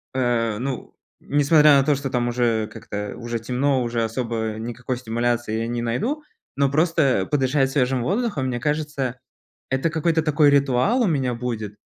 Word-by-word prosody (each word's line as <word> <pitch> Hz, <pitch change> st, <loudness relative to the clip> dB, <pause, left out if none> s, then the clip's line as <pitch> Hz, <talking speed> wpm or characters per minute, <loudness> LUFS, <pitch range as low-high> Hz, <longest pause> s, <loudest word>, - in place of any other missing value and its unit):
а, 115 Hz, -4 st, 0 dB
ну, 130 Hz, 0 st, -5 dB, 0.2 s
несмотря 145 Hz, 0 st, +5 dB
на -, -, +3 dB
то, 145 Hz, +1 st, +2 dB
что 135 Hz, 0 st, -4 dB
там 120 Hz, -1 st, 0 dB
уже 120 Hz, -3 st, 0 dB
как-то 105 Hz, -1 st, -6 dB
уже 120 Hz, 0 st, -4 dB
темно, 130 Hz, +3 st, 0 dB
уже 120 Hz, -1 st, -1 dB
особо 115 Hz, -1 st, -2 dB
никакой 120 Hz, +2 st, -4 dB
стимуляции 120 Hz, -1 st, -1 dB
я 115 Hz, -, -2 dB
не 120 Hz, 0 st, -2 dB
найду, 215 Hz, -, -1 dB, 0.4 s
но 140 Hz, 0 st, +3 dB
просто 150 Hz, -, +2 dB
подышать 135 Hz, -1 st, +1 dB
свежим 130 Hz, -2 st, +1 dB
воздухом, 195 Hz, -, -1 dB
мне 120 Hz, -1 st, -2 dB
кажется, 150 Hz, -3 st, -2 dB, 0.5 s
это 135 Hz, +5 st, 0 dB
какой-то 160 Hz, 0 st, +1 dB
такой 155 Hz, -1 st, +3 dB
ритуал 140 Hz, -, +2 dB
у -, -, +2 dB
меня 135 Hz, -8 st, 0 dB
будет, 115 Hz, -4 st, -4 dB
130 Hz, 160 wpm, -23 LUFS, 120-145 Hz, 0.5 s, несмотря